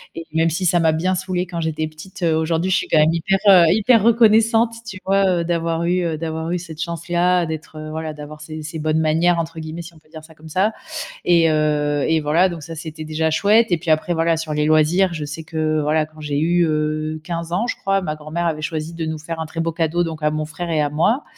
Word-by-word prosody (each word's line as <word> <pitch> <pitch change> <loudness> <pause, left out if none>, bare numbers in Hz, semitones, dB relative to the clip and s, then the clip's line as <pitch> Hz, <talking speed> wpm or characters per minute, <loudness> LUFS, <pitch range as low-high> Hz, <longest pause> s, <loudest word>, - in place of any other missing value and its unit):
et 165 - -5
même 165 +1 +2
si 185 +4 -2
ça 175 +1 +3
m'a 160 - +4
bien 180 +4 0
saoulée 185 0 -2
quand 175 -2 -5
j'étais 155 -1 -2
petite, 175 +5 -12
heu, 165 -2 +3
aujourd'hui, 160 +3 0
je - - +4
suis - - -2
quand 155 - +3
même 155 +2 +4
hyper, 170 +4 +1
heu, 180 -3 +8
hyper 220 +1 +4
reconnaissante, 225 0 +4
tu 185 -2 -7
vois? 195 -2 +2
Heu, - - -3
d'avoir 165 -1 -1
eu 175 -2 0
d'avoir 160 0 -3
eu, 180 - 0
heu, - - 0
cette 160 -2 -8
chance-là, 175 +1 0
d'être, 155 0 -7
heu, 155 - -7
voilà, 160 0 -4
d'avoir 150 0 -10
ces 155 0 -7
ces 160 +2 -6
«bonnes 155 +1 0
manières» 165 +2 +2
entre 165 0 -4
guillemets, 160 +2 -6
si 170 +1 -11
on 155 - -17
peut 155 - -30
dire 155 -1 -10
ça 160 0 -16
comme 155 +1 -13
ça 190 +7 +1 0.5
et 170 -2 +4
heu 150 -2 +1
et 160 0 +2
voilà, 150 +4 +2
donc 170 -3 -7
ça 165 +2 -8
c'était 155 0 -7
déjà 160 +1 -1
chouette 210 +8 +4
et 175 - +3
puis 165 +1 -6
après, 155 +3 +1
voilà, 165 0 +2
sur 155 -1 -4
les 150 0 0
loisirs, 155 +4 +3
je 155 -2 -4
sais 145 +3 -7
que, 155 -1 -1
voilà, 155 +1 +1
quand 155 0 -18
j'ai 145 -1 -2
eu, 170 +2 +2
heu, 155 0 -1
15 170 -1 -5
ans, 215 +7 0
je - - -2
crois, 195 0 0
ma 155 -4 -3
grand-mère 155 +3 -3
avait 155 -2 -2
choisi 155 +1 -4
de 165 -1 -4
nous 160 0 -3
faire 160 +1 -6
un 160 - -3
très 160 +1 -7
beau 165 - -1
cadeau 165 +1 0
donc 160 -2 -5
à 150 - +3
mon 155 0 -2
frère 170 +3 -6
et 155 -2 +1
à 145 - 0
moi 170 - +1
160 Hz, 260 wpm, -20 LUFS, 155-175 Hz, 0.5 s, heu